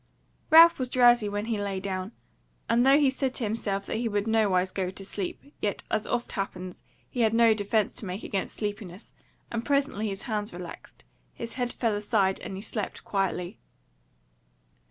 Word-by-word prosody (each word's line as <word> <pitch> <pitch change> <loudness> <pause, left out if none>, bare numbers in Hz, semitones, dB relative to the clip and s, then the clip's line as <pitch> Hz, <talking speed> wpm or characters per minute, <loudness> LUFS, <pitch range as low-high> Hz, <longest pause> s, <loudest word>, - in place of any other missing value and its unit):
Ralph 330 0 +8
was 255 -1 -1
drowsy 240 -4 +5
when 205 +1 -3
he 225 -2 -1
lay 200 -2 -2
down, 190 +1 -4 0.6
and 235 +1 +3
though 270 +2 +6
he 285 -3 +4
said 265 -1 -2
to - - 0
himself 205 -2 -2
that - - -3
he 230 0 -1
would 205 -1 0
nowise 200 -5 +2
go 185 -1 -2
to 195 +1 -9
sleep, 205 +9 -6
yet 205 - -1
as 215 -1 0
oft 240 -1 -2
happens, 185 -3 -5 0.3
he 250 - -7
had 225 0 +3
no 230 -1 +6
defence 210 0 0
to 210 - -4
make 185 +4 -5
against 195 - -3
sleepiness, 205 -2 -6 0.4
and 230 0 -2
presently 280 -6 0
his 195 -1 -5
hands 210 -3 -3
relaxed, 175 -1 -10 0.3
his 230 0 -6
head 245 -1 -2
fell 230 -3 0
aside, 205 -2 +1
and 190 - -6
he 190 - -6
slept 215 -2 -4
quietly. 185 -3 -2
210 Hz, 180 wpm, -27 LUFS, 195-235 Hz, 0.6 s, Ralph